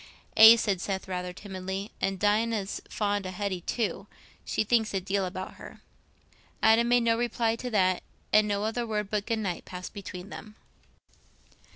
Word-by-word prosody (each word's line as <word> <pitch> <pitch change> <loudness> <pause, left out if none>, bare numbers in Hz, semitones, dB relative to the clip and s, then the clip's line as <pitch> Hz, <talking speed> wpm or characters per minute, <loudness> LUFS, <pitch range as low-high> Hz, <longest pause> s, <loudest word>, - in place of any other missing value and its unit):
"Aye," 220 +1 +11
said 200 -5 0
Seth, 190 -1 -3
rather 180 -1 -3
timidly, 190 +1 -6
"and 195 0 0
Dinah's 210 0 0
fond 205 -2 -1
o' - - -4
Hetty 185 -1 -3
too; 225 +4 -2 0.4
she - - 0
thinks 220 -1 +1
a - - +2
deal 195 +1 -1
about 185 +1 -7
her." - - -12 0.8
Adam 225 +2 +5
made 245 0 +4
no 230 0 +3
reply 230 -1 0
to 250 - -5
that, 185 -5 +2 0.3
and 215 0 +6
no 205 0 -1
other 230 +2 -2
word 210 -2 -2
but 210 -1 -1
"good 230 - 0
night" 195 -5 -3
passed 180 0 -8
between 195 -2 -8
them. 215 0 -10
205 Hz, 170 wpm, -28 LUFS, 190-225 Hz, 0.8 s, Aye